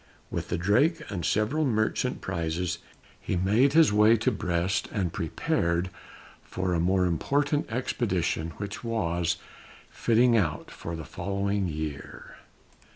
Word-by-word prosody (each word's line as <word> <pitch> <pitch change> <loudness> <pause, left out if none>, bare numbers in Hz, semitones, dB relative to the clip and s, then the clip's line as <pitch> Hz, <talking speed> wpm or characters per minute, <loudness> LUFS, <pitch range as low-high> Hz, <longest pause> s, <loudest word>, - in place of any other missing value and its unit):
With - - -3
the - - 0
Drake 135 - +2
and 90 -4 -3
several 110 - +1
merchant 120 0 0
prizes, 85 -1 -2 0.4
he - - -2
made 105 +10 +3
his 160 -8 +6
way 105 +2 +6
to 110 - +1
Brest, 90 +1 -1
and 95 -5 -1
prepared 85 +2 -1 0.5
for 95 -1 -2
a 85 - +1
more 90 +2 +2
important 145 - 0
expedition 95 -9 -1
which 100 +2 -6
was 85 -7 0 0.5
fitting 120 +1 +3
out 85 -9 0
for 85 - -6
the 80 -2 -7
following 100 +3 -1
year. 75 -3 -6
95 Hz, 130 wpm, -27 LUFS, 85-115 Hz, 0.5 s, his